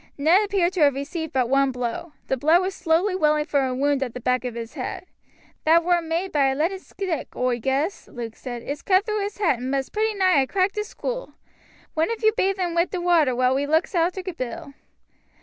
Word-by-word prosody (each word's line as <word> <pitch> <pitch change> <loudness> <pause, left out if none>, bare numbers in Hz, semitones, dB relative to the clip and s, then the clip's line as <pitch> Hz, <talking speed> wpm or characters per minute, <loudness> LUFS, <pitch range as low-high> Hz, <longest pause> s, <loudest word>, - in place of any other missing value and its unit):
Ned 330 +8 +4
appeared 390 -3 +1
to 370 - -3
have 285 -3 +4
received 320 +3 -4
but 255 -2 +1
one 275 +1 +3
blow. 250 +6 -4
The - - 0
blood 315 +7 +4
was 375 +1 -2
slowly 360 +3 +1
welling 300 -4 +2
from 280 -3 +1
a 255 -1 -2
wound 280 +1 +1
at 255 -3 -3
the - - -4
back 250 0 0
of 245 -2 -4
his 230 0 -6
head. 285 +4 -5 0.6
"That 330 +2 +5
war 350 0 +2
maade 335 +3 -2
by 280 -2 +3
a 265 - 0
leaded 345 +6 -1
stick, 375 -5 -5
oi 250 -1 0
guess," 275 - -1
Luke 230 -2 -7
said; 240 -2 -7
"it's 290 +1 -5
cut 380 +1 +3
through 425 -1 -1
his 405 +1 -4
hat, 340 - +1
and 255 +1 -4
must 270 -1 -2
pretty 435 0 0
nigh 370 -8 +4
ha' - - -5
cracked 385 0 +1
his 420 0 -3
skool. - - -5 0.6
One 320 +4 +1
of 460 0 -4
you 435 0 +5
bathe 390 -2 +1
un 350 -2 -1
wi' 340 +1 +3
the 370 - -5
water 335 -7 +3
while 255 +1 +2
we 280 +2 0
looks 320 +6 +1
arter 355 +2 0
Bill." 325 -3 -6
320 Hz, 230 wpm, -24 LUFS, 265-370 Hz, 0.6 s, That